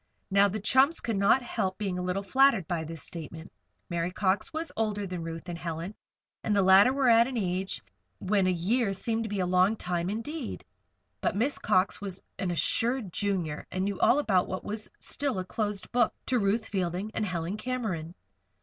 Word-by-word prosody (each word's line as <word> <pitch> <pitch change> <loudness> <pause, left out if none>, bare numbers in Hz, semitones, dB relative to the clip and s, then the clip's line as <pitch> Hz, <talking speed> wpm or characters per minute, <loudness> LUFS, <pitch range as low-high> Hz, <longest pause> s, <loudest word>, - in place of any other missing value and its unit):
Now, 200 +1 +5
the 210 +2 -3
chums 265 +9 +4
could 230 - -2
not 200 +6 +4
help 190 -5 -2
being 195 -4 -2
a - - -2
little 185 +2 -1
flattered 245 - +4
by 170 -3 -1
this 160 0 -7
statement. 165 0 -8 0.4
Mary 170 0 -1
Cox 190 +1 0
was 320 +1 -4
older 210 -2 -1
than 180 -2 -5
Ruth 165 +1 -6
and 170 -1 -5
Helen, 170 +3 -4 0.5
and 210 - +1
the 200 - +4
latter 190 +6 +7
were 270 -1 +1
at 230 0 +6
an 260 -2 -4
age 185 - -2 0.3
when 195 -1 +1
a - - +3
year 195 +5 +1
seemed 225 +4 -1
to - - -4
be 205 -1 -2
a - - +1
long 185 +4 +3
time 180 -3 -2
indeed. 240 +6 -5 0.6
Besides, - - 0
Miss 260 +7 +1
Cox 185 +2 +2
was 195 -2 -5 0.2
an 185 - -1
assured 225 +4 +1
Junior, 185 -7 -1
and 185 0 -1
knew 200 -2 -2
all 260 - +5
about 195 -11 +2
what 185 - -4
was 215 +1 -4
still 280 -6 -2
a 185 - -2
closed 205 0 -3
book 240 -2 +2
to 255 -2 +2
Ruth 215 +2 +1
Fielding 185 +1 -2
and - - -1
Helen 180 -1 -2
Cameron. 215 -9 -3
195 Hz, 195 wpm, -28 LUFS, 180-225 Hz, 0.6 s, latter